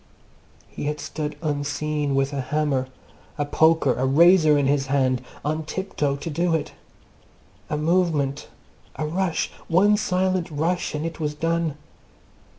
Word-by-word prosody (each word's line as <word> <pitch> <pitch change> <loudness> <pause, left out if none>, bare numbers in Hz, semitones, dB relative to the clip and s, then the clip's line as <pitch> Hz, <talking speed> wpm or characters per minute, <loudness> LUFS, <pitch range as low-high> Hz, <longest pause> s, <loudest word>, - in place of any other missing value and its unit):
He - - -7
had 150 0 -2
stood 150 -1 -4
unseen 145 -1 -1
with 135 +1 +1
a 140 - -1
hammer, 140 -1 0 0.5
a 145 - 0
poker, 160 -2 +3
a 125 - -2
razor 155 +1 +6
in 140 - +2
his 135 -1 +1
hand, 130 -2 +1 0.2
on 155 +1 -1
tiptoe 155 -5 -2
to 145 +4 -6
do 170 +2 +1
it. 155 - -3 1.0
A 150 - -1
movement, 155 -4 +1 0.5
a 155 - -3
rush, 170 +2 -1 0.2
one 200 +5 +4
silent 185 -3 0
rush 165 +3 -1
and 150 +2 -3
it 165 0 -5
was 150 -1 -2
done! 165 -1 -1
150 Hz, 145 wpm, -24 LUFS, 145-170 Hz, 1.0 s, razor